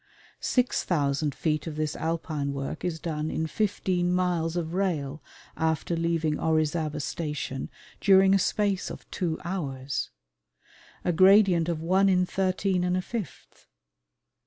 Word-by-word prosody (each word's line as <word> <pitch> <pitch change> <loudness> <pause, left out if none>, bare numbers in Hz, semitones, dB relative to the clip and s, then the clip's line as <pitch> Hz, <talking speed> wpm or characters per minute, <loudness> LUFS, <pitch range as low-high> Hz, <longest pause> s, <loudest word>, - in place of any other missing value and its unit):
Six 250 -1 +1
thousand 145 -3 0
feet 155 -1 -1
of 155 - -5
this 155 0 -2
alpine 155 -3 -2
work 135 0 -5
is 170 -3 -2
done 155 -2 -3
in 160 - -1
fifteen 185 -2 0
miles 175 -2 0
of 170 -1 -2
rail 155 -7 -1 0.3
after 160 +1 0
leaving 165 -2 0
Orizaba 155 -1 0
Station 150 -3 -4 0.3
during 195 -1 +6
a 195 - +4
space 200 0 0
of - - -9
two 165 -3 -2
hours! 140 -7 -3 1.0
A 180 - +3
gradient 185 -1 +5
of 160 -2 -2
one 190 +3 +3
in 180 -1 +3
thirteen 185 0 0
and 180 0 +1
a - - 0
fifth! 225 -4 -7
165 Hz, 135 wpm, -27 LUFS, 155-185 Hz, 1.0 s, during